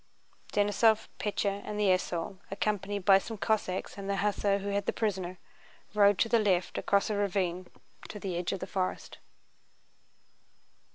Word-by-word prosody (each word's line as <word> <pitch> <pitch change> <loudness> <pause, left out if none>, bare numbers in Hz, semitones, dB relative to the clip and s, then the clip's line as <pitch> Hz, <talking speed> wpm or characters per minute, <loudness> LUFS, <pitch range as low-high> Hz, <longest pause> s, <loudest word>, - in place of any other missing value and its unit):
Denísov, 210 +2 +3
Pétya, 200 -1 -1
and 210 0 -5
the 205 -2 +3
esaul, 185 0 -1
accompanied 200 -1 -2
by 195 0 +7
some 225 +3 -7
Cossacks 200 -2 -1
and 200 0 -5
the 200 - +1
hussar 200 0 +1
who 200 0 -4
had 200 0 -1
the - - +3
prisoner, 185 -4 -2 0.6
rode 205 -2 +5
to 225 - +2
the 230 0 +3
left 190 -4 +1
across 200 +2 +1
a - - 0
ravine 185 -3 -1 0.4
to 210 - -7
the 190 -3 -4
edge 175 0 -1
of 195 - -4
the - - -2
forest. 185 -1 -3
200 Hz, 160 wpm, -30 LUFS, 185-210 Hz, 0.6 s, by